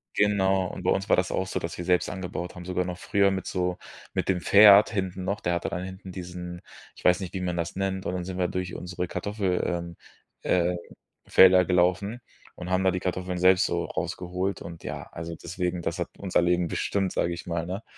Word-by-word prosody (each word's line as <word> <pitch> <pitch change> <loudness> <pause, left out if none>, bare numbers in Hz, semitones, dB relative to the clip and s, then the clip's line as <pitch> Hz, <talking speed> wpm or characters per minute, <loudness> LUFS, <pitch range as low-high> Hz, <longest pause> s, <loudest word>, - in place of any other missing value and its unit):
Genau. 95 -2 +2
Und 90 - -7
bei - - +1
uns 95 +1 -1
war - - +6
das 90 0 0
auch 95 - 0
so, - - -2
dass 85 - -5
wir 90 - -5
selbst 90 0 +2
angebaut 90 -1 -5
haben, 90 -1 -9
sogar 90 0 -1
noch 90 -1 -5
früher 100 +2 +2
mit 95 0 -3
so 90 -1 -1 0.4
mit - - -1
dem 90 -2 +1
Pferd 100 +1 +8
hinten 95 -3 -3
noch. 100 +3 -2
Der 85 - 0
hatte 85 - -1
dann 90 - -4
hinten 95 0 -8
diesen, 90 -1 -7 0.3
ich - - -15
weiß 90 0 +5
nicht, 95 -3 -6
wie 95 - -3
man 90 -1 -2
das 85 0 -3
nennt, 95 0 -2
und - - -2
dann 90 -1 -3
sind 95 0 -5
wir 90 - +1
durch 90 0 -4
unsere 90 0 -4
Kartoffel, 100 -2 -1
ähm, 85 -1 -3 0.5
äh, 90 0 +1 0.5
Felder 95 -1 +7
gelaufen 95 +6 +1 0.3
und 90 0 -7
haben 95 +1 +1
da 95 - +5
die 90 0 -3
Kartoffeln 90 0 -2
selbst 90 +1 +5
so 85 0 -1
rausgeholt 90 +2 -3
und 85 -1 -9
ja. - - -5
Also 85 0 -6
deswegen, 90 +1 -3
das 85 +3 -3
hat 85 - -1
unser 95 -3 +1
Leben 90 0 +2
bestimmt, 95 +2 -1
sage 85 - 0
ich 85 - -7
mal, 85 -1 -2
ne? 95 +5 -5
90 Hz, 225 wpm, -26 LUFS, 90-95 Hz, 0.5 s, Pferd